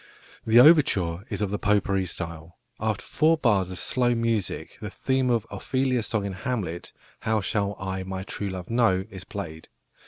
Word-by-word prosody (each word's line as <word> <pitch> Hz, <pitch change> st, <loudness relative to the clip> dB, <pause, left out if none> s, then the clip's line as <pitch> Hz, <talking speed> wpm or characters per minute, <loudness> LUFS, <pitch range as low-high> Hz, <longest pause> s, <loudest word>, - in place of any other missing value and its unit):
The 115 Hz, +2 st, +7 dB
overture 100 Hz, -, +5 dB
is -, -, -2 dB
of 100 Hz, -, -2 dB
the 105 Hz, -, -2 dB
"potpourri" 100 Hz, -2 st, +1 dB
style. 85 Hz, 0 st, -6 dB, 0.2 s
After -, -, -2 dB
four 160 Hz, +2 st, +3 dB
bars 105 Hz, -, +2 dB
of 90 Hz, -, -6 dB
slow 120 Hz, +2 st, +1 dB
music 115 Hz, -4 st, -2 dB
the -, -, -4 dB
theme 130 Hz, -1 st, 0 dB
of 115 Hz, -3 st, +1 dB
Ophelia's 130 Hz, -3 st, -1 dB
song 110 Hz, -4 st, -1 dB
in 100 Hz, -, -3 dB
Hamlet, 95 Hz, -5 st, -4 dB, 0.3 s
"How 110 Hz, 0 st, +1 dB
shall 100 Hz, 0 st, -1 dB
I 95 Hz, 0 st, -3 dB
my 95 Hz, 0 st, -5 dB
true 100 Hz, +1 st, -4 dB
love 95 Hz, +2 st, -6 dB
know?", 110 Hz, -6 st, +3 dB
is 95 Hz, -1 st, -8 dB
played. 80 Hz, -6 st, -7 dB
100 Hz, 175 wpm, -26 LUFS, 95-120 Hz, 0.3 s, The